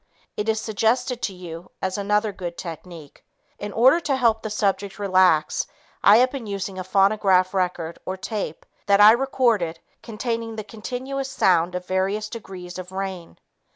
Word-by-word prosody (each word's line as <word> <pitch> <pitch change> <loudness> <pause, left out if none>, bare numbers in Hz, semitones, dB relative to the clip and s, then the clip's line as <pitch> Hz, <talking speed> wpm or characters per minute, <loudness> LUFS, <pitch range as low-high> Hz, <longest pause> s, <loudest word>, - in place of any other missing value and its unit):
It 210 +1 -2
is 220 0 +1
suggested 230 +3 0
to 195 - -2
you 175 -1 -9
as 190 0 -2
another 210 +1 +1
good 175 -3 -6
technique. 165 -3 -9 0.4
In 205 0 -5
order 260 +10 +5
to 290 -5 0
help 230 -4 +2
the 220 - -4
subject 200 -1 -1
relax, 185 -5 +3 0.4
I 205 +2 +8
have 255 +2 +4
been 260 -5 -6
using 195 -1 -4
a - - -3
phonograph 195 -1 +3
record 180 -3 -2
or 190 - -4
tape 190 -5 -5 0.2
that 200 0 +5
I 210 +1 +10
recorded 235 -9 +1 0.2
containing 230 0 -4
the 215 - -5
continuous 255 +6 -5
sound 180 -8 +2
of 180 0 -4
various 195 +3 -1
degrees 185 -5 -8
of 185 0 -8
rain. 190 -3 -5
200 Hz, 160 wpm, -23 LUFS, 185-225 Hz, 0.4 s, I